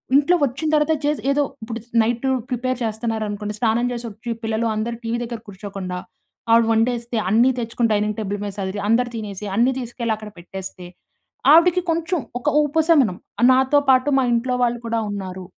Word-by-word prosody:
ఇంట్లో 290 +5 +5
వచ్చిన 280 +4 -1
తర్వాత 300 +1 +3
చేసి 295 0 0
ఏదో 290 +1 +2 0.2
ఇప్పుడు 230 +1 -5 0.2
నైట్ 235 +3 -1 0.2
ప్రిపేర్ 255 +1 -1
చేస్తున్నారనుకోండి 215 -2 -3
స్నానం 235 +1 +2
చేసి 240 -1 -5
వచ్చి 220 +3 -9
పిల్లలు 225 +1 0
అందరూ 225 +2 -2
టీవీ 230 +1 -1
దగ్గర 235 -1 -5
కూర్చోకుండా, 190 -2 -6 0.5
ఆవిడ 230 0 +6
వండేస్తే 235 +1 0
అన్నీ 235 +6 +5
తెచ్చుకొని 230 0 0
డైనింగ్ 210 0 0
టేబుల్ 205 -1 -3
మీద 205 -1 -4
సదిరి 190 +1 -3
అందరూ 240 +2 +3
తినేసి 210 -2 -6
అన్నీ 240 +4 +3
తీసుకెళ్ళి 235 -2 -3
అక్కడ 215 0 -9
పెట్టేస్తే, 185 0 -8 0.7
ఆవిడకి 350 +2 +5
కొంచెం 335 +2 -1 0.2
ఒక 295 +4 0 0.2
ఉపశమనం 295 - +3 0.4
నాతో 265 +3 +4
పాటు 260 +2 +4
మా 265 - +2
ఇంట్లో 250 +2 0
వాళ్ళు 240 0 +1
కూడా 230 0 0
ఉన్నారు. 190 -2 -6
230 Hz, 160 wpm, -21 LUFS, 210-255 Hz, 0.7 s, ఆవిడ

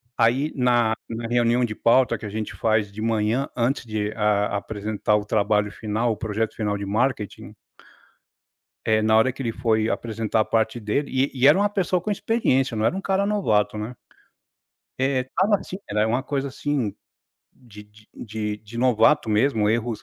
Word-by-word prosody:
Aí 130 +6 +2
na 120 -3 +2
na 115 0 -5
reunião 120 +1 +2
de 110 - -4
pauta, 120 +4 +3
que 110 - -7
a - - -6
gente 110 +1 -4
faz 110 -2 +1
de 105 +2 -8
manhã, 115 +4 0
antes 125 +2 0
de 105 -1 -2
a 105 -1 +1
apresentar 105 0 -1
o 105 -1 0
trabalho 105 -1 +1
final, 110 +3 -1
o 110 - -3
projeto 110 +1 -2
final 105 -2 -1
de 100 - -5
marketing 110 +1 -2 1.3
eh, 110 -1 +3
na 110 0 +4
hora 120 +4 +4
que 130 - -9
ele 120 -3 -1
foi 110 -1 0
apresentar 115 -1 -2
a - - 0
parte 110 +1 0
dele 115 +7 -1
e 130 +1 +1
e 130 0 +4
era 150 - +7
uma 205 +1 +2
pessoa 185 -3 0
com 210 - -4
experiência, 135 - +1
não 110 - +1
era 170 - +1
um 195 - -3
cara 195 0 0
novato, 110 - +1
né. 110 +4 -5 1.1
É, 135 -1 +2
estava 190 +11 +1
assim, 185 - -6
era 105 +1 +1
uma 120 +4 0
coisa 140 0 -3
assim, 130 -6 -2 0.6
de 105 -5 -14
de 105 +1 -22
de 105 -1 -4
de 110 +2 -10
novato 125 +3 +3
mesmo, 110 -1 +2
erros 115 0 -1
115 Hz, 185 wpm, -23 LUFS, 105-130 Hz, 1.3 s, era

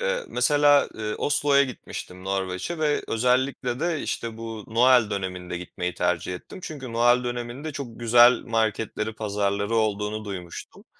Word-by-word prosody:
Eee, - - -1
mesela, 145 -1 +4
eee, 105 -1 -3
Oslo'ya 145 -1 +3
gitmiştim, 95 -7 -8
Norveç'e 95 - -3
ve 150 -2 +1
özellikle 125 +2 0
de, 170 -3 -1
işte, 115 -1 -4
bu 115 -2 -7
Noel 120 -2 +5
döneminde 90 -3 -4
gitmeyi 90 0 -5
tercih 90 +1 -1
ettim. 140 - -10
Çünkü 135 -6 -7
Noel 120 +1 +3
döneminde 120 +5 -4
çok 120 -5 -7
güzel 120 +1 +7
marketleri, 110 -1 -1
pazarları 100 0 -1
olduğunu 105 0 -1
duymuştum. 90 -4 -8
115 Hz, 135 wpm, -25 LUFS, 100-130 Hz, -, güzel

